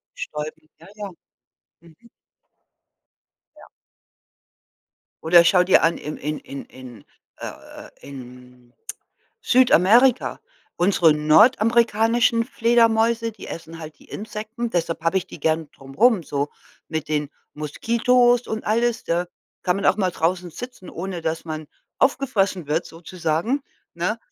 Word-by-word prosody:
bestäuben, 155 +1 -7
ja, 165 - -16
ja. 205 -2 -6 0.7
Mhm. 170 +7 -20 1.5
Ja. - - -15 1.6
Oder 170 +1 +6
schau 180 +1 +5
dir 185 - +4
an, 165 +1 +2
im 150 +1 -6
in 150 +2 -4
in 140 - -9
in 125 -5 -13 0.3
äh - - -7
äh, - - -11
in 125 -2 -13 0.7
Südamerika. 245 0 +4 0.4
Unsere 175 -3 +4
nordamerikanischen 230 +7 +3
Fledermäuse, 230 -1 +2
die 215 - -11
essen 165 0 -8
halt 155 -1 -10
die - - -19
Insekten. 220 +2 -5
Deshalb 165 -3 -2
habe 165 +3 +1
ich 185 - -7
die - - -12
gerne 160 0 0
drum 135 -1 -15
rum, 225 - +4
so 145 -1 -2 0.4
mit 160 -2 -4
den 150 -2 -1 0.2
Moskitos 240 - +2
und 220 0 -4
alles, 230 +1 0
da 175 +1 -1 0.4
kann 180 0 +1
man 200 - -1
auch - - +4
mal 190 -3 0
draußen 175 +2 -1
sitzen, 245 -2 -9
ohne 180 -1 -6
dass 160 0 -3
man 155 -1 -5 0.3
aufgefressen 205 - +1
wird, 155 +4 0
sozusagen, 175 - -3 0.3
ne? 180 +7 -2
180 Hz, 130 wpm, -22 LUFS, 155-230 Hz, 1.6 s, Oder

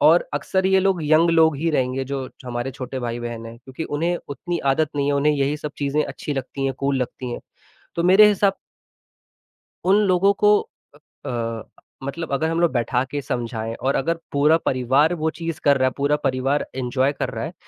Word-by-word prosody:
और - - +5
अक्सर 190 0 0
ये 190 0 +4
लोग 190 -3 +1
यंग 155 +3 +4
लोग 160 -3 +4
ही 165 +3 0
रहेंगे, 130 -2 0
जो 135 -1 -4 0.2
हमारे 120 +1 -3
छोटे 130 0 -6
भाई 120 -1 -3
बहन 115 -1 -5
हैं 115 +1 -10
क्योंकि 130 +6 -7
उन्हें 170 +4 -1
उतनी 170 +5 -4 0.2
आदत 155 0 0
नहीं 140 0 +1
है, 145 - +2
उन्हें 145 +2 +3
यही 140 +1 0
सब 150 -1 -6
चीज़ें 145 +1 +1
अच्छी 150 - -5
लगती 135 +1 -4
हैं, 135 - +1
कूल 140 0 -1
लगती 125 0 -6
हैं, - - -5 0.6
तो 170 - 0
मेरे 190 +4 +7
हिसाब 200 -1 +2 1.3
उन 190 +2 +5
लोगों 190 +2 +4
को 210 0 +6 0.7
अ - - -3
अ, 115 -2 -3 0.4
मतलब 155 +3 -5
अगर 160 +4 +1
हम 165 +1 -1
लोग 170 -4 +3
बैठा 125 +1 +1
के 145 - -2
समझाएँ 115 -4 -3
और 135 +3 -1
अगर 165 +5 0
पूरा 150 +3 +4
परिवार 135 +5 +2
वो 160 0 0
चीज़ 165 0 -5
कर 140 -1 +5
रहा 130 0 +2
है, - - 0
पूरा 145 +1 +2
परिवार 135 +2 0
एन्जॉय 130 +2 +1
कर - - -3
रहा - - -5
है, - - -7
140 Hz, 205 wpm, -22 LUFS, 130-165 Hz, 1.3 s, मेरे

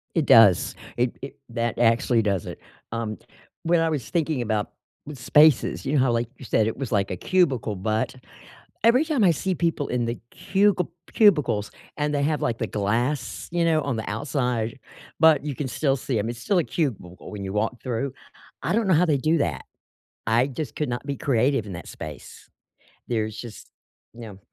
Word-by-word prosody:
It 160 -4 +2
does. 105 -6 +6 0.2
It 120 0 0
it 135 - -8
that 115 0 -2
actually 115 0 +3
does 100 -4 -1
it. - - -8 0.3
Um, 115 -2 -3 0.5
when 170 0 +3
I 165 0 +2
was 145 -7 -3
thinking 160 -6 0
about 110 -2 -1 0.4
spaces, 145 +2 +3
you 135 - -1
know, 145 - +3
how, 125 - +2
like, 115 0 0
you 130 - -11
said 110 0 +2
it 115 - -3
was 135 -3 -4
like 100 -3 +1
a 90 - -3
cubicle, 130 - +1
but, 110 +6 -1 0.7
every 245 +6 +5
time 290 -9 +1
I 175 - +6
see 185 +4 -1
people 165 -4 -1
in 120 -1 0
the 115 +1 -3 0.2
cugil 195 -2 +1 0.3
cubicles 150 - +3 0.3
and 150 0 -1
they 140 - +1
have, 150 0 0
like, 115 - 0
the 115 - -1
glass, 120 +6 -2
you 170 -1 +1
know, 160 -2 +3
on 140 -3 -2
the 110 - -4
outside, 125 0 -2 0.4
but 160 -3 +5
you 145 -3 -3
can 145 - -3
still 135 +3 0
see 125 -2 -2
'em- 110 +3 -2
it's 120 0 -6
still 180 +10 0
a - - +2
cubicle 105 - -4
when 100 -2 -6
you 95 +1 -5
walk 110 +3 -1
through- 130 +2 -2 0.5
I 175 - 0
don't 225 -2 +1
know 185 - +4
how 175 +3 +4
they 150 -4 +2
do 155 +5 +2
that. 75 - -2 0.6
I 115 +3 +3
just 140 -1 -6
could 150 - -1
not 120 +2 -4
be 140 -1 -3
creative 130 -3 +1
in 100 - -7
that 85 - -8
space. 75 -4 -10 0.6
There's 110 -2 -1
just 120 -3 -10 0.4
no. 110 -5 -10
125 Hz, 195 wpm, -24 LUFS, 110-155 Hz, 0.7 s, does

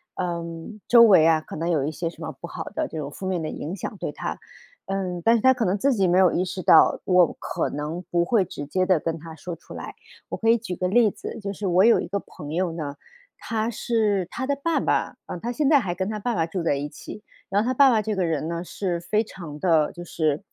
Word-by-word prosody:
嗯， 170 +3 -5
周 235 -1 +8
围 190 -8 +7
啊， 160 -1 +4
可 - - -10
能 165 +2 -2
有 155 -5 +1
一 150 - -2
些 165 +2 -3
什 165 0 -11
么 160 - -4
不 170 - -6
好 - - -6
的 - - -1
这 - - -8
种 145 -2 -4
负 190 - -6
面 185 -2 0
的 155 - -3
影 165 +6 -5
响， 200 - -6
对 - - -4
她。 - - -5 0.5
嗯， 185 -2 -3
但 230 +4 +5
是 230 - +1
她 260 0 +7
可 250 -2 -2
能 195 -1 +1
自 275 +6 +2
己 195 -5 +2
没 180 +1 +3
有 185 -2 +5
意 180 - +1
识 185 0 -5
到， 160 - +6
我 180 -3 +4
可 - - -2
能 150 +4 -4
不 170 0 +2
会 215 +1 +3
直 145 -4 -7
接 185 +6 0
地 185 -4 +4
跟 165 +1 -3
她 160 0 -10
说 170 +2 -7
出 165 - -13
来。 - - -7 0.4
我 - - -3
可 225 - +1
以 230 - +6
举 220 -5 -5
个 180 - -1
例 215 +2 +4
子， - - -8
就 200 -2 -4
是 200 0 -4
我 185 +2 +4
有 235 - +6
一 - - -4
个 200 +2 -2
朋 150 -5 -10
友 180 0 0
呢， 150 -4 -5 0.4
她 225 0 -2
是 215 -4 0
她 260 - -4
的 280 - +1
爸 335 +2 +1
爸， - - 0
嗯， 180 - -5
她 240 +6 -3
现 285 +2 +1
在 290 - +6
还 190 -8 -2
跟 190 +2 -2
她 215 - -3
爸 240 +4 -1
爸 165 - +1
住 175 +2 -4
在 160 - +2
一 145 +1 -4
起， 205 +7 -10 0.2
然 200 +2 +1
后 - - -4
她 255 - +1
爸 275 +1 +6
爸 225 -4 +3
这 215 0 -2
个 190 -3 0
人 155 -3 -1
呢， 170 0 -3
是 180 -2 -3
非 210 +6 0
常 170 -8 -9
的 160 -4 +3
就 175 - -8
是 155 0 -1
180 Hz, 290 characters per minute, -24 LUFS, 165-215 Hz, 0.5 s, 周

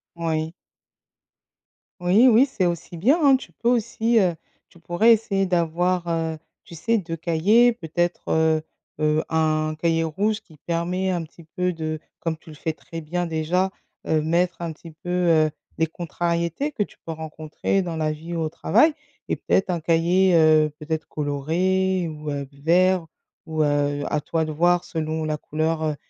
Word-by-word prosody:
Oui. 160 -1 -2 1.5
Oui 190 +8 +5
oui, 245 +2 +6
c'est 210 -9 0
aussi 170 0 -4
bien, 245 - +3
hein. 275 -1 +7
Tu - - -12
peux 235 - -1
aussi, 230 -1 +2
heu, 180 -4 +2 0.3
tu - - -20
pourrais 175 +8 +4
essayer 195 -3 0
d'avoir, 175 +1 0
heu, 165 -1 -1 0.3
tu 170 - -12
sais 225 +7 +1
2 165 -2 -5
cahiers, 195 +9 +4
peut-être. 175 -3 -2
Heu 160 -1 +2 0.4
heu, 155 0 +2
un 155 -1 +1
cahier 165 0 +2
rouge 205 +7 -1
qui 160 -7 -19
permet 175 +3 -1
un 175 -2 -1
petit 165 +1 -14
peu 180 +3 -2
de 155 -1 -4 0.2
comme 165 -1 -2
tu 160 - -17
le 150 - -11
fais 160 +1 -3
très 165 +1 -9
bien, 175 +3 -2
déjà, 170 +4 0 0.4
heu, 155 -1 +2
mettre 170 +3 +1
un 165 -2 -3
petit 165 +2 -13
peu, 160 +3 -11
heu, 165 -4 +3 0.3
des 160 - +3
contrariétés 170 - -2
que 220 -7 0
tu - - -14
peux 165 - -5
rencontrer 155 +4 -2
dans 170 -3 -4
la 155 -1 0
vie 165 +3 -6
ou 165 - -1
au 155 - -1
travail. 305 - +3 0.3
Et - - 0
peut-être 190 -1 +1
un 175 - -1
cahier, 170 +3 +3
heu, 155 -1 +5
peut-être 155 +1 -3
coloré 175 +5 0
ou, 150 -1 -7
heu, 140 -1 -3
vert 170 +4 +2 0.4
ou, 155 -1 0
heu, 145 -1 +1
à 150 - +1
toi 160 +1 -1
de 155 - -4
voir 175 +3 +2
selon 160 -1 -3
la 155 -1 -1
couleur, 155 +2 -2
heu, 155 -1 0
165 Hz, 175 wpm, -23 LUFS, 155-180 Hz, 1.5 s, hein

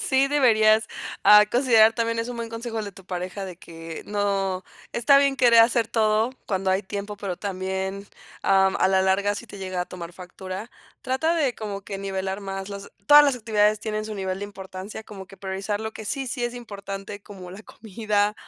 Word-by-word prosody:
Sí, 270 0 +2
deberías, 220 -6 +4 0.4
ah, 210 0 +9
considerar 230 -3 +5
también 230 0 -1
es 230 +1 -2
un 245 - -5
buen 230 -1 -4
consejo 230 0 -5
el 215 - -2
de 200 - -7
tu 190 -1 -15
pareja, 185 +2 -5
de 180 -3 -8
que 165 -1 -9
no 195 -2 -1 0.3
está 275 +4 +5
bien 280 -1 +2
querer 235 -3 +6
hacer 230 -1 +3
todo 220 +1 +2 0.2
cuando 190 -1 0
hay 190 +2 +1
tiempo, 205 +1 -6
pero 195 -3 -4
también 190 0 -4 0.4
am, 190 -1 +3
a - - +3
la 190 0 +3
larga 200 +2 +2
si 235 +3 -7
te 200 - -10
llega 185 -1 -3
a - - -1
tomar 175 -1 -8
factura. 185 +4 -8 0.3
Trata 315 +6 0
de 280 -7 +1
como 200 -2 -6
que 195 0 -6
nivelar 195 0 -3
más 195 0 -5
las 200 0 -8 0.2
todas 295 0 +9
las 275 -3 +2
actividades 215 -2 +2
tienen 215 0 -3
su 215 -1 -6
nivel 190 -1 -3
de - - -3
importancia, 195 +1 -8
como 195 -3 -10
que 195 - -15
priorizar 195 +2 -3
lo 220 0 -4
que 220 - -9
sí, 270 +5 -3
sí 245 -1 -2
es 240 0 -3
importante 200 -3 -7
como 185 -3 -11
la 195 +4 -10
comida 210 -1 -1
205 Hz, 205 wpm, -24 LUFS, 190-230 Hz, 0.4 s, ah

